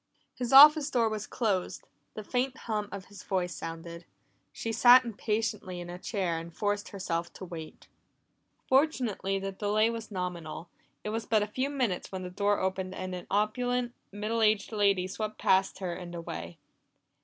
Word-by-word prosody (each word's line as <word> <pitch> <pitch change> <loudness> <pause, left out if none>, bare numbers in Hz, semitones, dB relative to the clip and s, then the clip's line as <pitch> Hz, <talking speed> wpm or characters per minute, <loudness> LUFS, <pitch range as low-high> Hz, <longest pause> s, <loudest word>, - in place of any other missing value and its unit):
His 245 -2 -4
office 295 +2 +9
door 230 -3 +2
was 215 -1 -4
closed; 200 -6 -1 0.3
the 215 - -6
faint 255 +4 -1
hum 210 -2 -2
of 200 -2 -7
his 205 - -12
voice 180 -2 -1
sounded. 165 +1 -7 0.5
She 230 - -4
sat 245 +3 +7
impatiently 210 -4 -2
in 175 0 -7
a 180 - -8
chair 185 -5 -1
and 165 +1 -9
forced 205 +4 -2
herself 170 -4 -3
to 185 - -8
wait. 165 -3 -9 0.8
Fortunately, 255 -9 +1
the 195 0 -3
delay 210 +3 +1
was 230 -1 -6
nominal; 175 -4 -5 0.3
it - - -3
was 225 +1 -3
but 215 -2 +3
a - - -3
few 260 +6 -2
minutes 250 -10 -2
when 190 -1 -5
the 180 - -6
door 205 +2 +1
opened 190 0 -2
and 185 0 -5
an 180 -1 -7
opulent, 245 +4 0 0.2
middle 215 +3 -2
aged 215 -1 +2
lady 200 -4 +2
swept 215 +3 -4
past 190 0 +2
her 185 -2 -3
and 175 0 -7
away. 170 0 -6
205 Hz, 170 wpm, -29 LUFS, 185-225 Hz, 0.8 s, office